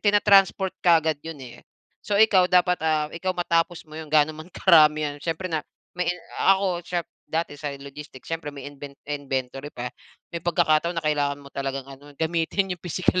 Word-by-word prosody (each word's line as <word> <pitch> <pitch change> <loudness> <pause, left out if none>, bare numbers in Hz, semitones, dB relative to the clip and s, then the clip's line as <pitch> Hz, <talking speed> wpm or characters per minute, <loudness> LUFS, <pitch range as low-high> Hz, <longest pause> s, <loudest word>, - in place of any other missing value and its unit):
tinatransport 200 -2 +4
kaagad 160 -4 +3
yun 165 +1 -7
eh. 120 - -12 0.4
So 205 - -1
ikaw 200 -4 +5
dapat, 180 -1 +3
ah, 155 -1 +1
ikaw 185 +2 -2
matapos 170 -1 0
mo 155 - -19
yun 160 -1 -7
gaano 155 0 +4
man 155 +2 -10
karami 155 -4 +5
yan 145 -1 -3
siyempre 165 +4 -3
nap 155 -2 -1 0.3
na 180 - 0 0.5
ako 190 -3 -1 0.5
dati 160 -2 -2
sa 150 - -3
logistics 140 -1 -11
siyempre 165 -2 -3
may 140 -2 -9
inven 140 0 -10
inventory 135 -1 -4
pa, 125 -3 -6 0.4
may 170 - -4
pagkakataon 170 0 +2
na 165 - -2
kailangan 145 -2 +1
mo 140 - -14
talagang 135 -1 -3
ano, 135 +2 -13
gamitin 170 +4 0
yung 180 - -8
pisikal 180 +1 0
160 Hz, 175 wpm, -25 LUFS, 145-175 Hz, 0.5 s, ikaw